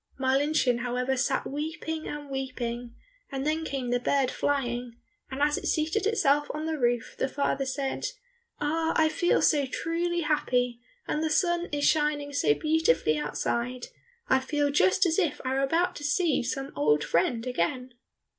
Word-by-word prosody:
Marlinchen, 270 Hz, -1 st, +2 dB
however, 250 Hz, +2 st, -1 dB
sat 265 Hz, +1 st, 0 dB
weeping 315 Hz, +2 st, -4 dB
and 295 Hz, -1 st, -6 dB
weeping, 245 Hz, -3 st, -4 dB, 0.4 s
and 270 Hz, 0 st, -3 dB
then 310 Hz, +1 st, 0 dB
came 265 Hz, -5 st, -3 dB
the 245 Hz, -, +2 dB
bird 265 Hz, +1 st, +1 dB
flying, 245 Hz, -4 st, -1 dB, 0.3 s
and 270 Hz, +2 st, -2 dB
as 295 Hz, 0 st, +2 dB
it -, -, -5 dB
seated 325 Hz, +7 st, +1 dB
itself 295 Hz, -9 st, +2 dB
on 305 Hz, +1 st, -3 dB
the 320 Hz, -1 st, -2 dB
roof 240 Hz, -1 st, 0 dB
the -, -, +1 dB
father 275 Hz, 0 st, -1 dB
said, 270 Hz, 0 st, -2 dB, 0.5 s
"Ah, 320 Hz, +2 st, 0 dB
I 315 Hz, 0 st, +4 dB
feel 350 Hz, +3 st, +2 dB
so 290 Hz, -4 st, +3 dB
truly 340 Hz, +4 st, -1 dB
happy, 250 Hz, -6 st, 0 dB, 0.3 s
and 300 Hz, -, -1 dB
the 315 Hz, -, +1 dB
sun 345 Hz, +2 st, +1 dB
is 290 Hz, -1 st, +1 dB
shining 295 Hz, -2 st, +1 dB
so 150 Hz, -, +3 dB
beautifully 305 Hz, -, +2 dB
outside, 235 Hz, -, -2 dB, 0.4 s
I 265 Hz, -, +4 dB
feel 290 Hz, +2 st, 0 dB
just 375 Hz, +6 st, +3 dB
as 330 Hz, +1 st, +2 dB
if 330 Hz, -7 st, 0 dB
I 260 Hz, -, 0 dB
were 270 Hz, -, +1 dB
about 335 Hz, +6 st, +1 dB
to 290 Hz, -, -8 dB
see 295 Hz, +1 st, +2 dB
some 270 Hz, +3 st, -3 dB
old 150 Hz, +1 st, +2 dB
friend 225 Hz, +7 st, +1 dB
again." 250 Hz, +3 st, -2 dB
280 Hz, 165 wpm, -28 LUFS, 250-310 Hz, 0.5 s, I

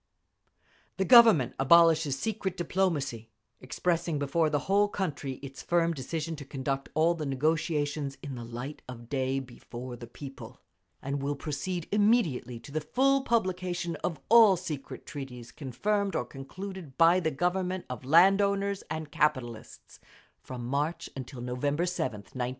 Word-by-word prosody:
The 190 Hz, -, +1 dB
Government 225 Hz, -, +7 dB
abolishes 160 Hz, 0 st, +5 dB
secret 195 Hz, +1 st, -3 dB
diplomacy, 155 Hz, -, -1 dB, 0.3 s
expressing 170 Hz, +4 st, -1 dB
before 150 Hz, +3 st, +1 dB
the 145 Hz, -2 st, 0 dB
whole 200 Hz, +2 st, +3 dB
country 155 Hz, -9 st, -3 dB
its 135 Hz, -1 st, -8 dB
firm 170 Hz, -1 st, +1 dB
decision 160 Hz, +3 st, -4 dB
to 145 Hz, -, -7 dB
conduct 135 Hz, 0 st, -3 dB
all 165 Hz, +2 st, +4 dB
the 155 Hz, -3 st, -4 dB
negotiations 145 Hz, 0 st, -1 dB
in 140 Hz, -2 st, -5 dB
the 120 Hz, -2 st, -6 dB
light 120 Hz, +5 st, -7 dB
of 120 Hz, -2 st, -9 dB
day 135 Hz, -1 st, 0 dB
before 125 Hz, -1 st, -8 dB
the 120 Hz, 0 st, -10 dB
people, 130 Hz, -1 st, -10 dB, 0.4 s
and 140 Hz, +1 st, -2 dB
will 145 Hz, +1 st, -1 dB
proceed 155 Hz, +5 st, -4 dB
immediately 200 Hz, -, +2 dB
to 140 Hz, -, -12 dB
the 155 Hz, +2 st, -1 dB
full 270 Hz, -, +2 dB
publication 185 Hz, -7 st, -1 dB
of 165 Hz, 0 st, -3 dB
all 220 Hz, -4 st, +7 dB
secret 155 Hz, -6 st, -6 dB
treaties 125 Hz, -4 st, -8 dB
confirmed 200 Hz, -, -1 dB
or -, -, 0 dB
concluded 170 Hz, +2 st, -8 dB
by 170 Hz, +2 st, +6 dB
the 165 Hz, -3 st, 0 dB
Government 180 Hz, +4 st, -1 dB
of 125 Hz, 0 st, -6 dB
land 180 Hz, +8 st, +6 dB
owners 200 Hz, 0 st, 0 dB
and 160 Hz, -1 st, -5 dB
capitalists, 130 Hz, -7 st, -2 dB, 0.4 s
from 125 Hz, -2 st, -7 dB
March 145 Hz, +6 st, -2 dB
until 130 Hz, -1 st, -7 dB
November 140 Hz, +6 st, -1 dB
7th, 160 Hz, -, -3 dB
1917. 125 Hz, -1 st, -2 dB
150 Hz, 145 wpm, -29 LUFS, 135-180 Hz, 0.4 s, Government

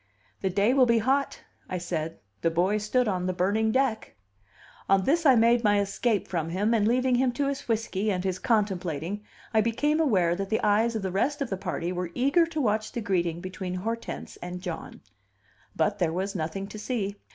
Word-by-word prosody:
"The 190 Hz, -, +1 dB
day 200 Hz, +6 st, +2 dB
will 260 Hz, -2 st, +5 dB
be 235 Hz, 0 st, +4 dB
hot," 270 Hz, +5 st, 0 dB, 0.3 s
I 185 Hz, -, -2 dB
said; 165 Hz, -2 st, -3 dB, 0.2 s
"'The 165 Hz, -, +2 dB
boy 180 Hz, +6 st, +1 dB
stood 235 Hz, +4 st, +1 dB
on 185 Hz, -3 st, -1 dB
the 185 Hz, -, 0 dB
burning 205 Hz, +5 st, +1 dB
deck.'" 260 Hz, -, 0 dB, 0.7 s
On 195 Hz, 0 st, +4 dB
this 320 Hz, -, +2 dB
I 265 Hz, -, +7 dB
made 235 Hz, +1 st, +4 dB
my 205 Hz, -1 st, +4 dB
escape 200 Hz, +2 st, 0 dB
from 165 Hz, -3 st, -2 dB
him, 205 Hz, +6 st, +1 dB
and, 215 Hz, -2 st, +3 dB
leaving 255 Hz, +2 st, +2 dB
him 250 Hz, +1 st, +3 dB
to 285 Hz, +2 st, -1 dB
his 280 Hz, 0 st, -4 dB
whiskey 220 Hz, -3 st, -1 dB
and 180 Hz, -2 st, -1 dB
his 185 Hz, -1 st, -2 dB
contemplating, 190 Hz, -, -1 dB, 0.3 s
I 220 Hz, -, +5 dB
became 290 Hz, +8 st, +1 dB
aware 185 Hz, -, +3 dB
that 195 Hz, +1 st, -4 dB
the 220 Hz, -, 0 dB
eyes 220 Hz, +3 st, +3 dB
of 215 Hz, -, -2 dB
the 190 Hz, -, -2 dB
rest 285 Hz, -, 0 dB
of 275 Hz, -6 st, -3 dB
the -, -, +1 dB
party 175 Hz, -1 st, -3 dB
were 180 Hz, -1 st, -3 dB
eager 280 Hz, +7 st, +3 dB
to 320 Hz, -2 st, -4 dB
watch 215 Hz, -4 st, 0 dB
the 240 Hz, -, -3 dB
greeting 175 Hz, -4 st, -1 dB
between 185 Hz, 0 st, -5 dB
Hortense 225 Hz, +5 st, -5 dB
and 180 Hz, 0 st, -6 dB
John. -, -, -6 dB, 0.7 s
But 205 Hz, 0 st, 0 dB
there 170 Hz, -3 st, +1 dB
was 190 Hz, +3 st, -2 dB
nothing 170 Hz, +3 st, -3 dB
to 215 Hz, -, -8 dB
see. 205 Hz, -3 st, -3 dB
210 Hz, 205 wpm, -27 LUFS, 185-235 Hz, 0.7 s, I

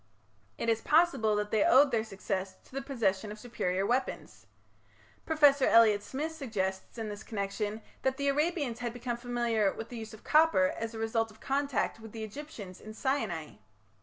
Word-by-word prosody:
It -, -, -3 dB
is 225 Hz, -1 st, +2 dB
possible 305 Hz, -10 st, +3 dB
that 210 Hz, 0 st, -2 dB
they 215 Hz, -2 st, +3 dB
owed 275 Hz, +2 st, +6 dB
their 225 Hz, -2 st, +1 dB
success 195 Hz, -2 st, -4 dB
to -, -, -22 dB
the 275 Hz, +1 st, -3 dB
possession 215 Hz, -7 st, -1 dB
of 210 Hz, -, -7 dB
superior 195 Hz, -5 st, -2 dB
weapons. 250 Hz, +5 st, -2 dB, 0.8 s
Professor 290 Hz, -4 st, +5 dB
Elliot 220 Hz, -3 st, +6 dB
Smith 295 Hz, +8 st, -4 dB
suggests 215 Hz, -11 st, -3 dB
in 225 Hz, -1 st, -3 dB
this 205 Hz, 0 st, -6 dB
connection 210 Hz, 0 st, -3 dB, 0.2 s
that 265 Hz, 0 st, 0 dB
the 280 Hz, -, -1 dB
Arabians 290 Hz, -4 st, 0 dB
had 240 Hz, -1 st, -3 dB
become 245 Hz, 0 st, -3 dB
familiar 235 Hz, -4 st, +1 dB
with 225 Hz, -, -7 dB
the 245 Hz, -, -7 dB
use 220 Hz, 0 st, -8 dB
of 215 Hz, -, -18 dB
copper 305 Hz, -2 st, +4 dB
as 230 Hz, 0 st, -5 dB
a -, -, -5 dB
result 225 Hz, 0 st, 0 dB
of 220 Hz, 0 st, -17 dB
contact 275 Hz, -3 st, -1 dB
with 225 Hz, -1 st, -11 dB
the 225 Hz, -1 st, -5 dB
Egyptians 215 Hz, -, -8 dB
in 215 Hz, 0 st, -10 dB
Sinai. 220 Hz, -, -2 dB
225 Hz, 180 wpm, -30 LUFS, 210-275 Hz, 0.8 s, owed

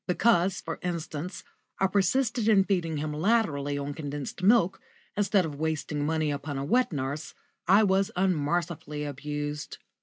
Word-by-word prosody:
Because, 185 Hz, -1 st, +2 dB
for -, -, -5 dB
instance, 170 Hz, 0 st, -4 dB, 0.3 s
I 190 Hz, -, +2 dB
persisted 225 Hz, +5 st, +2 dB
in 200 Hz, -3 st, +6 dB
feeding 175 Hz, -5 st, 0 dB
him 150 Hz, +1 st, -3 dB
latterly 150 Hz, -6 st, +1 dB
on 140 Hz, 0 st, -3 dB
condensed 145 Hz, +2 st, -5 dB
milk, 195 Hz, -2 st, +4 dB, 0.3 s
instead 205 Hz, -2 st, +2 dB
of 145 Hz, -3 st, -6 dB
wasting 150 Hz, -2 st, -1 dB
money 155 Hz, -1 st, +1 dB
upon 145 Hz, 0 st, -4 dB
a 135 Hz, -, -2 dB
wet 250 Hz, -, +2 dB
nurse, 145 Hz, +1 st, -4 dB, 0.3 s
I 195 Hz, +4 st, +6 dB
was 195 Hz, 0 st, +2 dB
unmercifully 170 Hz, -3 st, -1 dB
abused. 145 Hz, +1 st, -4 dB
160 Hz, 145 wpm, -28 LUFS, 145-195 Hz, 0.3 s, in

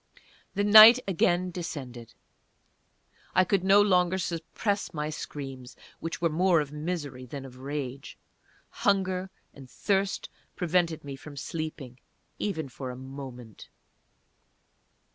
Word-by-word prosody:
The 200 Hz, -, +1 dB
night 215 Hz, +3 st, +10 dB
again 180 Hz, 0 st, +1 dB
descended. 130 Hz, -9 st, -7 dB, 1.2 s
I 185 Hz, -, +6 dB
could 190 Hz, 0 st, +1 dB
no 195 Hz, +2 st, +6 dB
longer 180 Hz, -2 st, +2 dB
suppress 185 Hz, +3 st, -3 dB
my 150 Hz, 0 st, -2 dB
screams, 135 Hz, -4 st, -7 dB, 0.2 s
which 165 Hz, -, -5 dB
were 170 Hz, -, +1 dB
more 175 Hz, +2 st, +3 dB
of 145 Hz, -2 st, -3 dB
misery 150 Hz, -5 st, -5 dB
than 135 Hz, +2 st, -7 dB
of 130 Hz, -1 st, -12 dB
rage. 135 Hz, -1 st, -6 dB, 0.5 s
Hunger 190 Hz, -1 st, 0 dB, 0.2 s
and 135 Hz, -2 st, -13 dB
thirst 195 Hz, +4 st, -1 dB, 0.3 s
prevented 170 Hz, -2 st, 0 dB
me 140 Hz, -1 st, -6 dB
from 145 Hz, +1 st, -12 dB
sleeping, 150 Hz, -5 st, -6 dB, 0.4 s
even 160 Hz, -8 st, -2 dB
for 130 Hz, 0 st, -7 dB
a 125 Hz, -, -6 dB
moment. 130 Hz, -3 st, -10 dB
160 Hz, 120 wpm, -28 LUFS, 135-185 Hz, 1.2 s, night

